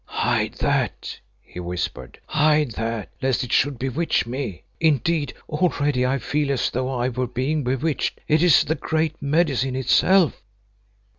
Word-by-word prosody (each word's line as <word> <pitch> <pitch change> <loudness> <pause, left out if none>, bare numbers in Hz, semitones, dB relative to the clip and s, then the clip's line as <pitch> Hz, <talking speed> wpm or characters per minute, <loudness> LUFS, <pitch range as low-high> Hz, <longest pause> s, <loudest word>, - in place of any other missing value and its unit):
"Hide - - -1
that!" - - -1 0.2
he - - -10
whispered, 90 0 -5
"hide 150 -3 +2
that, 115 -1 -3
lest 130 0 +1
it 125 - -6
should 140 0 +2
bewitch 135 +5 0
me. 120 -6 -5 0.2
Indeed, 155 0 +1 0.2
already 145 -5 +1
I 135 +2 +1
feel 145 +2 -1
as 135 - 0
though 130 +1 -2
I 125 -2 -1
were 125 0 -2
being 140 +5 -1
bewitched. 135 +5 -1
It 155 +1 +3
is 175 -4 +6
the 160 - 0
Great 160 +1 -2
Medicine 140 -4 +1
itself." 155 +5 +3
135 Hz, 145 wpm, -23 LUFS, 125-155 Hz, 0.2 s, is